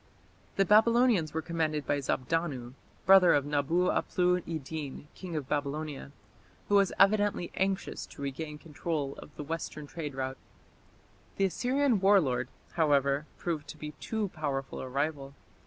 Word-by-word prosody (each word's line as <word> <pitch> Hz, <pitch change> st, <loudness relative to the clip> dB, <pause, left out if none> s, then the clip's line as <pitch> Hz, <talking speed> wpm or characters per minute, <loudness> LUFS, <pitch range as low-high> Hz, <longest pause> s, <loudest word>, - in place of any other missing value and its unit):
The 195 Hz, -, +3 dB
Babylonians 220 Hz, -4 st, +4 dB
were 160 Hz, 0 st, -3 dB
commanded 155 Hz, -3 st, -1 dB
by 145 Hz, -, +1 dB
Zabdanu, 130 Hz, -2 st, -2 dB, 0.3 s
brother 190 Hz, -3 st, +7 dB
of 145 Hz, -1 st, +1 dB
Nabu 145 Hz, +4 st, +1 dB
aplu 180 Hz, 0 st, +2 dB
iddin, 155 Hz, -3 st, -5 dB
king 180 Hz, -3 st, -7 dB
of 145 Hz, -4 st, -3 dB
Babylonia, 145 Hz, 0 st, -3 dB, 0.6 s
who 205 Hz, -, +4 dB
was 195 Hz, -2 st, +4 dB
evidently 205 Hz, -3 st, +3 dB
anxious 195 Hz, 0 st, -2 dB
to -, -, -12 dB
regain 150 Hz, +2 st, -4 dB
control 150 Hz, -2 st, -3 dB
of -, -, -11 dB
the 150 Hz, -, -6 dB
western 155 Hz, -1 st, -5 dB
trade 150 Hz, -2 st, -6 dB
route. 130 Hz, 0 st, -3 dB, 1.0 s
The 195 Hz, -, +2 dB
Assyrian 250 Hz, +4 st, +1 dB
war 195 Hz, +1 st, +6 dB
lord, 130 Hz, -6 st, 0 dB, 0.2 s
however, 145 Hz, -2 st, +2 dB
proved 155 Hz, -4 st, -3 dB
to 155 Hz, -, -9 dB
be 150 Hz, 0 st, -6 dB
too 220 Hz, -3 st, -2 dB
powerful 140 Hz, -5 st, -3 dB
a 130 Hz, -, -5 dB
rival. 140 Hz, 0 st, -2 dB
155 Hz, 145 wpm, -30 LUFS, 140-185 Hz, 1.0 s, brother